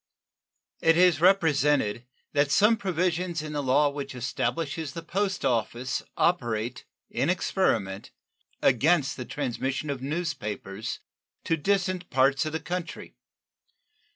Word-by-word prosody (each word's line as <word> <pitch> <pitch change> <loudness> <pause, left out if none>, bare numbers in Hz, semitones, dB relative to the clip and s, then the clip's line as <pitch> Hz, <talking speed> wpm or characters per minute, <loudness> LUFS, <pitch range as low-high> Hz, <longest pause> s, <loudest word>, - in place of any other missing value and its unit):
It 165 0 +4
is 175 -4 +5
represented 150 - +3 0.3
that 145 -1 +3
some 210 +10 +5
provisions 180 -3 -1
in 155 -1 -6
the 145 - -1
law 140 +2 +3
which 140 -2 -6
establishes 145 +4 -2
the 165 - -6
post 195 +3 -1
office 120 +2 -1 0.2
operate, 120 -7 0 0.3
in - - 0
experiment, 115 - 0 0.5
against 145 +3 +3
the 125 - -6
transmission 135 +2 -3
of 135 -2 -5
news 165 +5 -2
papers 105 +1 -6 0.4
to 165 - +1
distant 185 +1 0
parts 135 +3 +3
of - - -3
the 160 - -1
country. 175 0 -5
150 Hz, 125 wpm, -27 LUFS, 130-175 Hz, 0.5 s, is